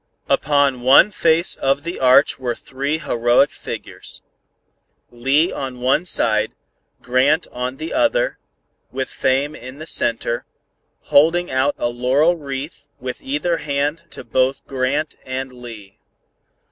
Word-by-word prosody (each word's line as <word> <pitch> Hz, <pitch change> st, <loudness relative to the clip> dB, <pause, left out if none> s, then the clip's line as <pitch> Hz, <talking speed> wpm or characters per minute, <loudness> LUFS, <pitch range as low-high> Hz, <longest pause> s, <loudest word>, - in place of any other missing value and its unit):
Upon 140 Hz, -3 st, +2 dB
one 135 Hz, +11 st, +6 dB
face 165 Hz, -2 st, +2 dB
of 135 Hz, +1 st, 0 dB
the 170 Hz, +1 st, -5 dB
arch 130 Hz, +3 st, +4 dB
were 120 Hz, -2 st, -2 dB
three 140 Hz, +4 st, -3 dB
heroic 120 Hz, -3 st, +2 dB
figures. -, -, -8 dB, 0.9 s
Lee 135 Hz, +8 st, +2 dB
on 130 Hz, -2 st, -5 dB
the -, -, -13 dB
one 130 Hz, +7 st, +1 dB
side, 110 Hz, -10 st, +1 dB, 0.5 s
Grant 130 Hz, +6 st, +2 dB
on 125 Hz, +1 st, -4 dB
the 160 Hz, +2 st, -5 dB
other, -, -, +1 dB, 0.5 s
with 130 Hz, 0 st, -3 dB
Fame 135 Hz, +3 st, 0 dB
in 130 Hz, +2 st, -10 dB
the 155 Hz, -, -8 dB
center, 115 Hz, -5 st, 0 dB, 0.5 s
holding 165 Hz, +4 st, +3 dB
out 130 Hz, +2 st, +1 dB
a 120 Hz, -, -1 dB
laurel 130 Hz, +8 st, +2 dB
wreath 140 Hz, -1 st, -7 dB
with 125 Hz, -1 st, -6 dB
either 150 Hz, +5 st, -1 dB
hand 150 Hz, +3 st, -2 dB
to -, -, -10 dB
both 130 Hz, +1 st, 0 dB
Grant 135 Hz, +3 st, -2 dB
and 130 Hz, 0 st, -5 dB
Lee. 115 Hz, -6 st, -11 dB
135 Hz, 135 wpm, -20 LUFS, 125-155 Hz, 0.9 s, one